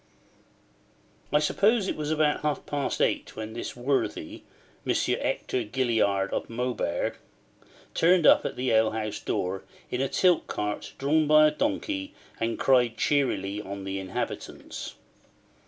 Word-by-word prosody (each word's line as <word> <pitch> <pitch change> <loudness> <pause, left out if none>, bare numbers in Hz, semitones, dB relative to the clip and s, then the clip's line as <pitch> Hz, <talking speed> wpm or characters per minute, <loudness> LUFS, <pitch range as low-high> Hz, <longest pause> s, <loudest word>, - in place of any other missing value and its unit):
I 150 - +5
suppose 200 +8 +2
it - - -1
was 150 -1 -3
about 155 -1 +2
half 150 -1 -1
past 145 -2 -1
eight - - -1
when 110 0 -6
this 120 - -5
worthy, 130 +3 -2 0.4
Monsieur - - +1
Hector 125 - -1
Gilliard 110 -5 +1
of - - -2
Maubeuge, 115 -7 -2 0.8
turned 175 0 +4
up - - +7
at - - -3
the 125 0 -1
ale 110 0 +4
house 110 -1 -3
door 95 +1 -2 0.3
in 125 - -1
a 135 - 0
tilt 180 -3 +3
cart 105 0 -3
drawn 150 +3 +2
by 155 0 +7
a 150 - +4
donkey, 290 - -2 0.2
and 115 0 -1
cried 125 -3 +3
cheerily 105 -8 0
on 100 0 -7
the 95 0 -3
inhabitants. 95 -1 -5
130 Hz, 140 wpm, -27 LUFS, 110-155 Hz, 0.8 s, up